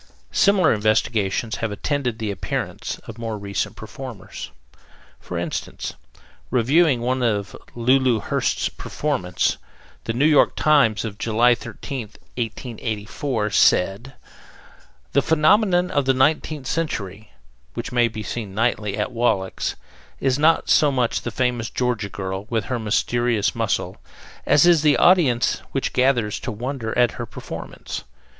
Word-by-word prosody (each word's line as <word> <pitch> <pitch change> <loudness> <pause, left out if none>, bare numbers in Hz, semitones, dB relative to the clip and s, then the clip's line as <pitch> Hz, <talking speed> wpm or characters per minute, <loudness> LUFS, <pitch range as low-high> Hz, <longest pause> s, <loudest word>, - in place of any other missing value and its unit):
Similar 200 -4 +4
investigations 110 0 0
have 115 - -2
attended 125 +1 -2
the 110 -2 -2
appearance 95 - -4
of 115 0 -9
more 115 -2 -3
recent 100 +1 -3
performers. 110 +1 -8 0.7
For - - -6
instance, - - -4 0.6
reviewing 130 +2 +3
one 130 +2 0
of 105 -4 -1 0.2
Lulu 125 0 +3
Hurst's - - 0
performances, - - -2 0.5
the 115 - -1
New 130 +5 +2
York 155 -2 +4
Times, 140 -9 +3
of 105 -2 -6
July 115 +2 +4
13th, 120 -1 -7 0.2
1884, 115 0 -3
said: 100 +7 +2 1.0
The - - +4
"Phenomenon 180 +3 +3
of 145 -2 +1
the 135 0 +3
Nineteenth 150 +1 +1
Century," 110 - -3 0.5
which - - -4
may 120 -1 +3
be 110 -2 -6
seen 105 -5 -5
nightly 110 -2 0
at 105 - -1
Wallack's, 115 -6 0 0.4
is 135 0 +1
not 160 +2 +3
so 150 -2 +4
much 125 -3 0
the - - -4
famous 120 -1 -1
Georgia 120 -5 -1
girl, 95 +1 -5
with 115 -2 -1
her 125 -2 -2
mysterious 115 0 +1
muscle, - - -1 0.5
as 150 - +5
is 170 -3 +5
the 150 -1 +4
audience 150 -10 +4
which 135 - -1
gathers 125 -5 +2
to 120 - -4
wonder 120 +1 -4
at 120 -1 +4
her - - -6
performance. - - -7
120 Hz, 135 wpm, -22 LUFS, 110-135 Hz, 1.0 s, as